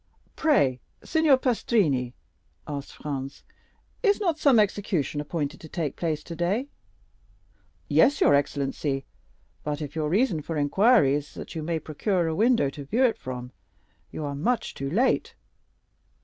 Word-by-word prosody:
"Pray, 140 - +2 0.2
Signor 315 -4 +4
Pastrini," 195 - +1 0.5
asked 145 -2 -6
Franz, 135 -2 -6 0.6
"is 410 -3 +3
not 340 -6 0
some 275 -6 +5
execution 195 -8 0
appointed 150 0 -3
to 160 - -11
take 160 -5 -3
place 155 -3 -2
today?" 180 - -2 1.2
"Yes, 165 - +4
your - - +5
excellency; 140 -1 -1 0.6
but 150 0 -3
if 150 -1 -6
your 155 -2 -1
reason 190 -3 +2
for 160 +1 -4
inquiry 150 - +4
is 145 0 -3
that - - -8
you 160 - -4
may 165 +1 -1
procure 170 +4 -1
a 160 - -1
window 220 - +3
to 145 0 -8
view 225 - +1
it 235 - +1
from, 125 -1 -6 0.6
you 155 - -5
are 140 - -3
much 225 - -1
too 135 0 -4
late." 235 - +1
160 Hz, 145 wpm, -26 LUFS, 145-225 Hz, 1.2 s, some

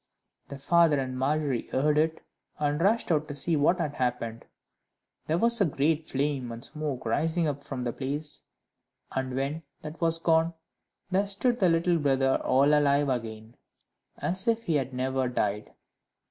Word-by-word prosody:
The 140 - -8
father 165 +1 +3
and 130 -1 -3
Margery 140 -1 -1
heard 150 +3 +1
it, 160 +1 0 0.3
and 150 +1 0
rushed 205 +1 +2
out 155 -1 +1
to 145 - -6
see 160 +4 +1
what 155 +5 +3
had 150 -4 -2
happened: 120 -3 -3 0.8
there 160 - +1
was 235 +3 +4
a - - +6
great 155 +1 0
flame 135 -3 -1
and 115 +3 -7
smoke 150 -5 -5
rising 165 +9 +1
up 145 -1 -3
from 130 -3 -5
the 120 -1 -2
place, 145 +3 -4 0.7
and 130 -1 -3
when 140 +4 -2 0.2
that 155 +2 -8
was 165 0 +2
gone, 165 0 +2 0.6
there 195 +2 +2
stood 240 +5 +1
the 185 - +4
little 170 +1 +2
brother 135 -2 +2
all 140 +3 +4
alive 145 -1 +3
again 110 -2 -4 0.6
as 185 +4 -2
if 230 0 +1
he 170 - -1
had 135 -3 0
never 130 0 -1
died. 105 -4 -2
145 Hz, 165 wpm, -28 LUFS, 130-165 Hz, 0.8 s, a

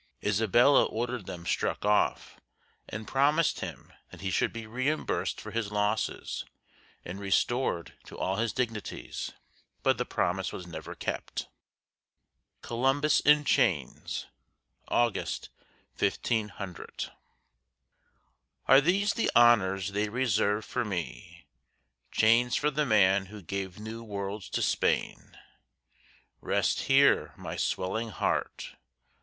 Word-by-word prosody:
Isabella 115 +6 +5
ordered 120 -2 -3
them 85 -1 -7
struck - - -1
off, 105 0 +1 0.5
and 105 +1 -6
promised 150 +4 +2
him - - -7 0.2
that - - -12
he 95 -1 -2
should - - +1
be 115 -1 -7
reimbursed 130 +7 -1
for - - -8
his 115 -3 -2
losses 105 +1 -1 0.6
and 90 +3 -6
restored 100 -1 0
to - - -11
all 95 +1 -1
his 115 0 0
dignities; 115 -5 -4 0.5
but - - +2
the - - +2
promise - - -1
was 90 - -7
never 80 -2 -8
kept. - - -4 1.1
COLUMBUS 135 +5 +2
IN 150 0 +5
CHAINS 85 - 0 0.6
[August, 120 -2 0 0.5
1500] 105 -5 -2 1.6
Are 135 +1 +8
these 195 +6 +2
the 230 - 0
honors 100 -5 +5
they 105 +1 0
reserve 110 -3 +1
for 125 - -1
me, 95 -7 -6 0.7
Chains 115 +2 +4
for 150 +1 +1
the 150 +1 0
man 95 -3 +4
who 105 +2 -10
gave 95 +1 -4
new 110 +2 -7
worlds 100 -2 -5
to - - -1
Spain! - - 0 1.0
Rest - - +1
here, 140 +1 +4
my - - -6
swelling 110 +5 -1
heart! 100 - -2
110 Hz, 115 wpm, -29 LUFS, 100-125 Hz, 1.6 s, Are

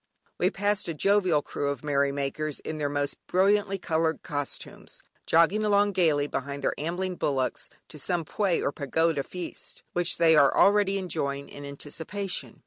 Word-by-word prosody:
Anon - - -43
we - - +3
passed 205 +1 0
a 165 - -3
jovial 185 -3 +3
crew 140 - -3
of 140 -2 -4
merrymakers 140 +1 -1
in 155 -1 -5
their 145 -1 0
most 145 0 -2
brilliantly 195 +1 +2
coloured 160 -2 -1
costumes, 145 -1 -5 0.2
jogging 170 +6 +4
along 205 -1 +3
gaily 160 -6 +2
behind 140 0 -4
their - - +1
ambling 180 +4 -2
bullocks, 135 -3 -1 0.2
to 150 - -10
some 170 +3 -1
Pwé 195 +1 0
or - - +1
Pagoda 160 +1 0
Feast, 180 +5 -7
which 175 0 +1
they 165 -1 +5
are 140 -3 +5
already 200 -1 +4
enjoying 140 -7 -3
in 145 - -10
anticipation. 160 +7 -5
160 Hz, 160 wpm, -27 LUFS, 145-190 Hz, 0.2 s, they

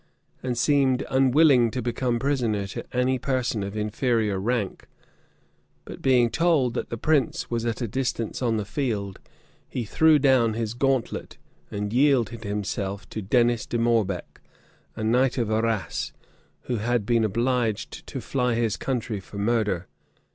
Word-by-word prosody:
and 125 -2 -2
seemed 135 0 +2
unwilling 130 -1 +5
to 125 - -4
become 120 0 -1
prisoner 120 -6 0
to 100 - -6
any 130 +1 +1
person 130 -4 -1
of 100 +2 -5
inferior 105 -1 0
rank. 110 -1 -2 1.0
But - - -9
being 125 -3 +3
told 155 -7 +2
that - - -3
the 115 - -4
prince 145 -1 0
was 120 0 -1
at 115 +2 -2
a - - -1
distance 120 0 -2
on 115 -3 +1
the 105 - -2
field, 105 -6 -3 0.5
he 120 - -3
threw 160 +8 +4
down 130 -6 +3
his 115 -1 -2
gauntlet, 130 -1 -1 0.3
and 105 +1 -4
yielded 125 -4 +2
himself 100 -2 -3
to 110 - -5
Dennis 120 +3 +2
de 120 - -1
Morbec, 115 -6 0 0.5
a 110 - -4
knight 125 +4 +2
of 115 -3 0
Arras, 110 -3 -1 0.5
who 125 - -3
had 115 0 0
been 115 0 +2
obliged 115 0 -1
to - - -5
fly 125 -3 0
his 115 -3 0
country 120 -5 -2
for 95 +2 -11
murder. 105 -4 0
120 Hz, 150 wpm, -25 LUFS, 110-130 Hz, 1.0 s, unwilling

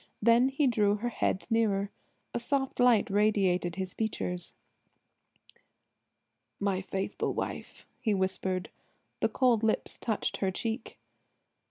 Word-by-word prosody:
Then 235 +4 +5
he 275 +2 +1
drew 210 -5 +3
her 235 +3 -2
head 190 - -1
nearer. 205 -3 +2 0.4
A - - -1
soft 270 +2 -1
light 245 -4 +5
radiated 195 -4 +2
his 190 -1 -4
features. 180 -5 -2 2.1
"My 195 -2 0
faithful 190 0 -3
wife!" - - -5
he 220 -5 +1
whispered. 190 -1 0 0.5
The - - +2
cold 245 -4 +3
lips 220 -1 0
touched 220 -3 -1
her 195 - 0
cheek. 225 +5 -4
210 Hz, 120 wpm, -30 LUFS, 190-235 Hz, 2.1 s, Then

